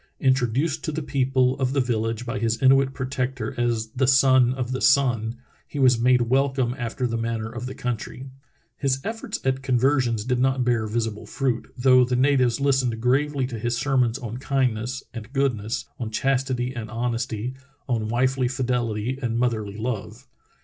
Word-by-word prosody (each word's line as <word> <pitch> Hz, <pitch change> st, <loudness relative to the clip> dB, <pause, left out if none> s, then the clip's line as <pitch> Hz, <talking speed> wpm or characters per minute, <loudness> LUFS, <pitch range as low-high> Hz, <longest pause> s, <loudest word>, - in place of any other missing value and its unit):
Introduced 130 Hz, +4 st, +1 dB
to 155 Hz, -, -1 dB
the 155 Hz, +1 st, -3 dB
people 130 Hz, -2 st, +1 dB
of 130 Hz, -1 st, 0 dB
the 140 Hz, -, +1 dB
village 115 Hz, -2 st, -1 dB
by 115 Hz, -, -3 dB
his 115 Hz, +1 st, 0 dB
Inuit 135 Hz, 0 st, +4 dB
protector 130 Hz, -3 st, -3 dB
as 115 Hz, -2 st, -1 dB
the 130 Hz, +3 st, 0 dB
Son 130 Hz, -2 st, +5 dB
of 130 Hz, -1 st, -3 dB
the 130 Hz, -, -2 dB
Sun, 125 Hz, -6 st, +3 dB, 0.3 s
he -, -, -8 dB
was 130 Hz, -3 st, +4 dB
made 125 Hz, +1 st, +4 dB
welcome 130 Hz, 0 st, +1 dB
after 120 Hz, 0 st, -3 dB
the 115 Hz, -1 st, -1 dB
manner 115 Hz, -1 st, -3 dB
of 125 Hz, -, -6 dB
the 130 Hz, -, -7 dB
country. 125 Hz, +1 st, -4 dB, 0.5 s
His 135 Hz, -1 st, 0 dB
efforts 225 Hz, -1 st, -4 dB
at 130 Hz, 0 st, +1 dB
conver 135 Hz, +2 st, +2 dB
sions 115 Hz, -4 st, -2 dB
did 125 Hz, -1 st, 0 dB
not 130 Hz, 0 st, +2 dB
bear 120 Hz, -3 st, +1 dB
visible 110 Hz, -1 st, -3 dB
fruit, 130 Hz, -4 st, -2 dB
though 130 Hz, 0 st, +5 dB
the 125 Hz, 0 st, 0 dB
natives 130 Hz, -2 st, +3 dB
lis 140 Hz, -1 st, +2 dB
tened 115 Hz, -2 st, -2 dB
gravely 135 Hz, +3 st, +1 dB
to 120 Hz, -3 st, -5 dB
his 120 Hz, +2 st, -1 dB
sermons 125 Hz, -4 st, +1 dB
on 120 Hz, -3 st, -6 dB
kindness 130 Hz, -2 st, -1 dB
and 115 Hz, 0 st, -8 dB
goodness, 120 Hz, -5 st, -1 dB
on 115 Hz, -3 st, -3 dB
chastity 130 Hz, +1 st, -1 dB
and 110 Hz, -2 st, -5 dB
honesty, 115 Hz, 0 st, -2 dB, 0.3 s
on 115 Hz, -4 st, -1 dB
wifely 130 Hz, +2 st, +1 dB
fidelity 125 Hz, -1 st, -1 dB
and 115 Hz, -2 st, -1 dB
moth 125 Hz, 0 st, +2 dB
erly 105 Hz, -1 st, -6 dB
love. 115 Hz, -2 st, -4 dB
125 Hz, 175 wpm, -24 LUFS, 115-135 Hz, 0.5 s, Son